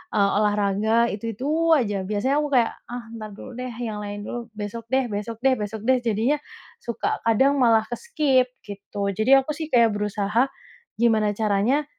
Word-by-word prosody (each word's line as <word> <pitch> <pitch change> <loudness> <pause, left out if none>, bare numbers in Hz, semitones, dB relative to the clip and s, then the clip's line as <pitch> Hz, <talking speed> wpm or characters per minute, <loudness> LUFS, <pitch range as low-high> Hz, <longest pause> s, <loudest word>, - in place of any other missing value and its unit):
eee, 200 -1 +4
olahraga 210 +2 +2
itu-itu 270 +11 -1
aja 205 -7 0
biasanya 215 +7 0
aku - - -1
kayak, 235 -2 +3 0.2
"Ah 245 -1 -5
ntar 215 -1 -7
dulu - - -10
deh 255 -1 -4
yang 225 -3 -4
lain 205 0 -6
dulu, 240 +2 -6
besok 210 +2 -5
deh, 265 -1 +2
besok 210 +3 -4
deh, 265 - +5
besok 210 +1 -4
deh." 260 -1 +4
jadinya 235 +6 +1 0.4
suka 235 - -2
kadang 265 +6 +4
malah 225 -3 +4
ke-skip 275 - +1 0.2
gitu. 200 0 -4
Jadi 220 +5 +1
aku 270 +3 -3
sih 315 -1 -5
kayak 235 -5 +4
berusaha 210 +4 0 0.5
gimana 215 -3 +2
caranya, 220 +7 +1
225 Hz, 165 wpm, -24 LUFS, 205-255 Hz, 0.5 s, deh